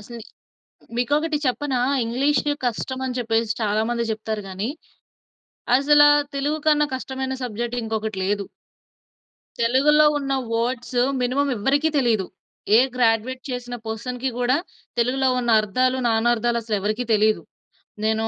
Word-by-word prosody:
అసలు 235 +3 -10 0.8
మీకొకటి 295 +5 +1
చెప్పనా 260 0 0 0.2
ఇంగ్లీష్ 265 +5 +1 0.2
కష్టం 250 +2 -3
అని 250 - -4
చెప్పేసి 225 -2 0
చాలా 215 0 +1
మంది 235 -1 -1
జెప్తారు 220 -1 -3
గాని, 190 +4 -3 1.1
అసలా 295 +1 +6 0.3
తెలుగు 295 +3 -1
కన్నా 300 -1 +4
కష్టమైన 265 0 -4
సబ్జెక్ట్ 240 +1 -3
ఇంకొకటి 220 -2 -3
లేదు. 200 0 -1 1.1
తెలుగులో 280 +6 +4
ఉన్న 275 -1 -3 0.2
వర్డ్స్ 245 +2 -1 0.2
మినిమమ్ 275 +3 +1
ఎవ్వరికీ 285 +9 +1
తెలీదు. 225 -7 +1 0.5
ఏ - - +7 0.2
గ్రాడ్యుయేట్ 245 +1 +1
చేసిన 245 -1 -5
పర్సన్‌కి 250 +3 -3
గూడా 245 +2 +2 0.4
తెలుగులో 260 +3 +1
ఉన్న 240 -1 -1
అర్థాలు, 255 +5 +1
నానర్థాలు 235 +1 +1
అసలెవరికీ 215 +2 -2
తెలీదు. 215 0 +3 0.6
నేనూ 220 0 +1
240 Hz, 120 wpm, -22 LUFS, 220-265 Hz, 1.1 s, ఏ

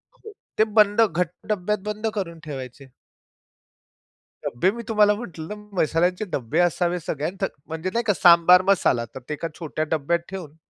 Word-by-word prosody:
हो, 440 - -13 0.2
ते 215 - +5 0.2
बंद, 205 +1 +5
घट्ट 180 -5 +1 0.2
डब्यात 210 +1 -1
बंद 210 +1 -3
करून 175 -6 -4
ठेवायचे. 135 -1 -8 1.6
डब्बे 120 +11 +1
मी 235 +2 -7
तुम्हाला 210 -2 +4
म्हटलं, 200 -5 -7 0.2
मसाल्यांचे 175 +6 +1
डब्बे 130 +5 -1
असावेत 175 0 +1
सगळ्या 150 +1 -2
थं 195 - +2 0.2
म्हणजे 160 +3 -4
नाही 235 - 0
का, 205 - +4
सांबार 175 0 +6
मसाला. 130 -11 +2
तर - - -5
ते - - -1
एका 160 +3 -4
छोट्या 155 -1 -3
डब्यात 160 +2 +1
ठेवून, 180 -6 -8
175 Hz, 155 wpm, -23 LUFS, 155-205 Hz, 1.6 s, सांबार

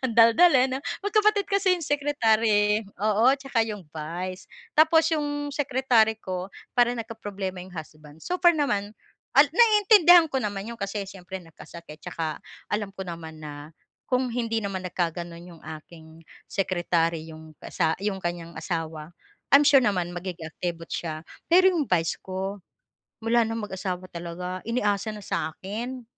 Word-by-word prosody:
ang 230 - -3
daldal 230 +10 +7
eh, 250 - +5
'no, 265 +1 -2 0.2
magkapatid 425 -1 +3
kasi 395 -2 +2
'yong 335 - -6
secretary, 225 -8 +2 0.2
oo 215 +3 +1
tsaka 270 -4 -1
'yong 210 -5 -3
vice 175 +4 -6 0.2
tapos 320 +1 +5
'yong 290 -1 -2
secretary 255 -6 +2
ko 185 -2 -5 0.2
para 245 0 +3
nagkaproblema 205 -5 -5
'yong 180 0 -11
husband 155 -1 -11
super 350 -2 +3
naman 210 -7 -1 0.4
naintindihan 355 - +6
ko 265 - 0
naman 205 -5 -3
'yon 230 +2 -8
kasi 200 +1 -3
siyempre 190 -1 -8
nagkasakit 165 -1 -12
tsaka 160 -2 -4 0.3
alam 205 -2 -2
ko 190 - -5
naman 165 -3 -8
na, 150 +1 -9 0.3
kung 255 -1 0
hindi 230 -2 -1
naman 195 -1 -3
nag 180 - -9
kaganon 170 -1 -3
'yong 175 -2 -14 0.2
aking 160 -1 -15 0.2
secretary 170 -4 0
'yong 160 0 -12
asa 160 -3 -1
'yong 195 -1 -3
kanyang 170 -1 -4
asawa. 160 -3 -4 0.4
I'm 285 +1 +7
sure 275 -3 +7
naman 180 -6 0
magiging 175 -2 -6
activot 165 +1 -5
siya 160 -1 -5 0.2
pero 370 +2 +7
'yong 330 - +2
vice 165 -2 +2
ko, 190 +1 -5 0.6
mula 230 +1 +3
ng 225 0 -3
mag-asawa 185 -2 -5
talaga 175 +2 -5
inaasa 215 -3 0
na 210 - -9
sa 160 -5 -3
akin. 240 +6 -6
205 Hz, 150 wpm, -26 LUFS, 175-255 Hz, 0.6 s, daldal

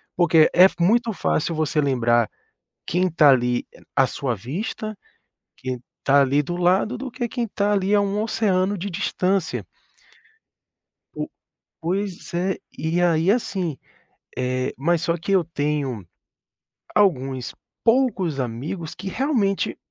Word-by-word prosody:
porque 170 -3 +5
é 180 - +8
muito 225 +6 +3
fácil 170 -4 0
você 155 -1 +1
lembrar 120 -4 +2 0.6
quem 180 +2 +1
tá, 155 -3 +6
ali, 125 -1 +1 0.3
à 135 -1 +4
sua 135 -4 -2
vista, 200 - -5 0.6
quem 130 -1 -4 0.2
tá 140 +1 +5
ali 140 +2 +3
do 175 +4 -4
lado, 190 +7 +2
do 260 0 -6
que 240 -1 -3
quem 235 -2 -2
tá 205 0 0
ali 195 +1 +1
a 205 - +4
um 200 +1 -1
oceano 200 -3 +1
de 200 +3 -4
distância. 185 0 -1 1.5
O - - -4 0.5
pois 185 +2 -3
é, 185 +2 0 0.2
e 160 +4 0
aí, 170 +1 +3
assim, 190 - -1 0.6
eh, 130 0 -1
mas 165 +4 +1
só 170 0 0
que 175 +4 -4
eu 185 -3 +4
tenho 145 - -2 0.9
alguns 135 - +1 0.3
poucos 225 - +2
amigos 140 +8 -4
que 190 +1 -6
realmente 220 -6 0
175 Hz, 135 wpm, -23 LUFS, 140-200 Hz, 1.5 s, é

